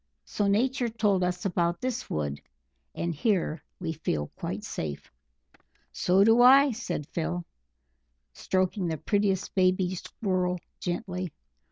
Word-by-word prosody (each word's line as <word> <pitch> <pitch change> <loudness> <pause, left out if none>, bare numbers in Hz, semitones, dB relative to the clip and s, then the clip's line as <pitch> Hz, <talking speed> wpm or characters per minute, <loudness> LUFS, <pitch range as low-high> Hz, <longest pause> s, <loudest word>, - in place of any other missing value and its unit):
So 205 - -1
Nature 245 +4 +2
told 210 -4 +1
us 180 +1 -2
about 175 -2 +1
this 255 -1 -3
wood, 70 -2 -2 0.5
and 170 0 -2
here 165 -3 0 0.2
we 165 -2 -3
feel 75 - -2
quite - - -4
safe." 75 -2 -5 0.8
"So 185 +2 +3
do 225 +3 +6
I," 270 +3 +8
said 210 -9 -4
Phil, 175 +1 -2 0.9
stroking 185 - 0
the 160 -1 -2
prettiest 200 +3 0
baby 185 -1 +2
Squirrel 185 -1 -1 0.2
gently. 180 -1 -3
185 Hz, 125 wpm, -28 LUFS, 170-210 Hz, 0.9 s, I